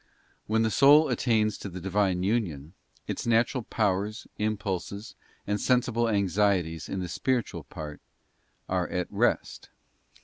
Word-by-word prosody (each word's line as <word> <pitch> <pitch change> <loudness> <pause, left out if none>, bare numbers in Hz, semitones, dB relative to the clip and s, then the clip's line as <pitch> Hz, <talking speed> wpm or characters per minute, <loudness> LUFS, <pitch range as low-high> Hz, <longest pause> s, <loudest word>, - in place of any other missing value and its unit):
When 110 +1 +2
the 110 - +1
soul 145 +5 +6
attains 110 -4 +1
to 100 - -6
the 90 0 -7
Divine 95 -1 0
union, 90 -8 -1 0.3
its - - -4
natural 120 +3 +2
powers, 105 +1 -1
impulses, 100 0 -3 0.3
and 105 0 -1
sensible 120 -2 +2
anxieties 95 -5 +1
in 95 - -3
the 90 - -3
spiritual 120 +7 -2
part, 75 -1 -8 0.7
are 90 -1 0
at 90 0 -2
rest. - - 0
105 Hz, 130 wpm, -27 LUFS, 90-115 Hz, 0.7 s, soul